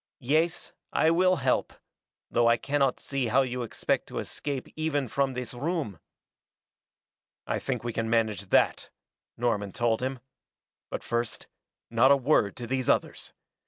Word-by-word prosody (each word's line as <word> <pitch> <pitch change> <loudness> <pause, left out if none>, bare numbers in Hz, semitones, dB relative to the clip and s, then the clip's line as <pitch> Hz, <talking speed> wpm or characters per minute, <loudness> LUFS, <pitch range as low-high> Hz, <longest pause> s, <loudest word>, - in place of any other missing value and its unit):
Yes, 160 +6 0 0.2
I 160 - +3
will 185 +2 +4
help, - - 0 0.6
though 120 0 +3
I 115 0 +5
cannot 140 0 +1
see 135 -3 -2
how 130 +5 +4
you 125 -1 -3
expect 120 - -1
to - - -7
escape 140 -3 -4
even 150 -4 -1
from 135 +2 0
this 125 -1 -4
room." 140 - -3 1.5
"I - - -1
think - - -3
we 120 -1 -3
can 115 0 -2
manage 110 -4 +1
that," - - +2 0.5
Norman 105 -5 -1
told 115 -1 +1
him. 130 +1 -2 0.7
"But - - -4
first 120 0 -2 0.5
not 120 +3 +5
a 140 - +7
word 125 -7 +2
to 120 - -6
these 130 +1 -1
others. - - 0
125 Hz, 150 wpm, -28 LUFS, 115-140 Hz, 1.5 s, a